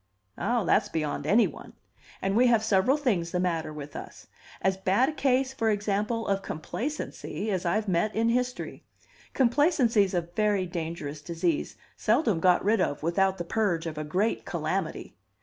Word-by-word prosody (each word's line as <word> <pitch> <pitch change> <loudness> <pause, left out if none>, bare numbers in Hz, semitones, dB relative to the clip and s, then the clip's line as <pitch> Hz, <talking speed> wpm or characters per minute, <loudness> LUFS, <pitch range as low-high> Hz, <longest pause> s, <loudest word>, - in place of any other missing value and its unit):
"Ah, 240 -2 0
that's 200 +3 +2
beyond 155 -2 -2
any 225 +3 +5
one! - - -8 0.5
And 195 +1 0
we 250 +3 +5
have 230 -3 +3
several 220 +6 +3
things 205 - 0
the 180 - -1
matter 165 -3 -1
with 150 -1 -8
us - - -9 0.3
as 190 +1 +1
bad 190 +8 +2
a - - -1
case, 265 -2 +1
for 225 -4 0
example, 210 +2 -1
of 195 0 +1
complacency 215 - -4
as 185 -2 -1
I've 210 +5 0
met 190 +4 +1
in 225 +1 +2
history. 250 +1 -2 0.5
Complacency's 245 - +3
a 175 - +2
very 195 +3 0
dangerous 160 -4 -5
disease, 170 0 -1 0.2
seldom 220 - +2
got 180 +2 +3
rid 215 -1 +3
of 145 -4 -1
without 190 +3 +2
the 175 - -4
purge 175 -5 0
of 155 -2 -4
a - - -2
great 185 +9 0
calamity. - - -3
195 Hz, 165 wpm, -27 LUFS, 170-230 Hz, 0.5 s, any